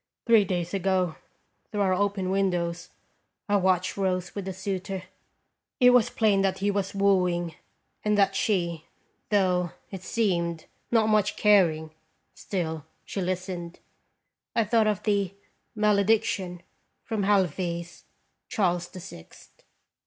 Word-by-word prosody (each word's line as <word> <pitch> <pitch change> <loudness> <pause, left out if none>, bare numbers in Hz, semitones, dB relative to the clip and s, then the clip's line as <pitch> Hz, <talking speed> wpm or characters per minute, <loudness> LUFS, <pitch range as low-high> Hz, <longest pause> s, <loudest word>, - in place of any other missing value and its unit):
Three 225 -4 +5
days 175 -1 -2
ago, 185 -3 +1 0.6
through 210 - -1
our 190 -2 +3
open 195 -1 0
windows, 175 -3 -1 0.6
I 205 -1 +3
watched 185 -1 +1
Rose 185 -2 -1
with 200 -2 -5
a - - -2
suitor. 190 0 -4 0.8
It 250 -1 +7
was 245 -3 +4
plain 210 -3 +2
that 190 -1 +1
he 200 +1 0
was 200 -1 -2
wooing, 180 -4 +2 0.5
and 210 -1 +2
that 195 -1 +3
she, 170 -6 0 0.4
though, 180 -4 +2 0.2
it 190 -3 -6
seemed, 170 -6 -1 0.2
not 225 -2 +3
much 210 -1 +2
caring, 170 -7 +3 0.4
still 160 -5 -4 0.2
she 195 - -4
listened. 180 -1 -4 0.8
I 230 - +4
thought 220 +1 +2
of 210 -1 0
the 200 -3 0 0.4
"Malediction" 205 -3 +1 0.4
from 220 -3 -2
HaleVy's 175 -3 0 0.4
"Charles 175 -4 0
the 185 - -10
Sixth." 170 - -13
190 Hz, 125 wpm, -27 LUFS, 175-205 Hz, 0.8 s, It